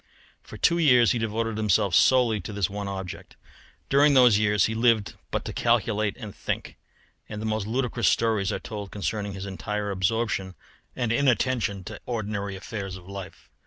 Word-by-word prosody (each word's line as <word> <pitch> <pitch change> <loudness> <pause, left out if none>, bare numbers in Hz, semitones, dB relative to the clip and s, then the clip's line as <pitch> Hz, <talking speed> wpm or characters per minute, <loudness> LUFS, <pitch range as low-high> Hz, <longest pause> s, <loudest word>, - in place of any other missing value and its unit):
For - - -11
two 170 - +3
years 125 -7 +5
he 120 - 0
devoted 115 0 -2
himself 105 -3 +2
solely 120 -1 +4
to 85 - -7
this 100 -3 -1
one 100 0 -4
object. 95 -2 -7 0.5
During 140 +1 +4
those 125 -5 +6
years 105 -3 +3
he 110 - -1
lived 115 -2 +2 0.2
but - - -3
to - - -5
calculate 110 -3 +1
and 105 -5 -8
think, - - -4 0.5
and 105 - -6
the 110 - -5
most 110 -2 -1
ludicrous 120 0 0
stories 110 -3 +2
are - - -1
told 105 -2 -7
concerning 105 0 -3
his 95 0 -6
entire 105 +1 -3
absorption 95 -1 -1 0.4
and 120 -3 -1
inattention 120 -6 +1
to - - -9
ordinary 105 -4 -3
affairs 95 0 -6
of 90 -1 -15
life. 100 -1 -9
105 Hz, 170 wpm, -26 LUFS, 100-115 Hz, 0.5 s, those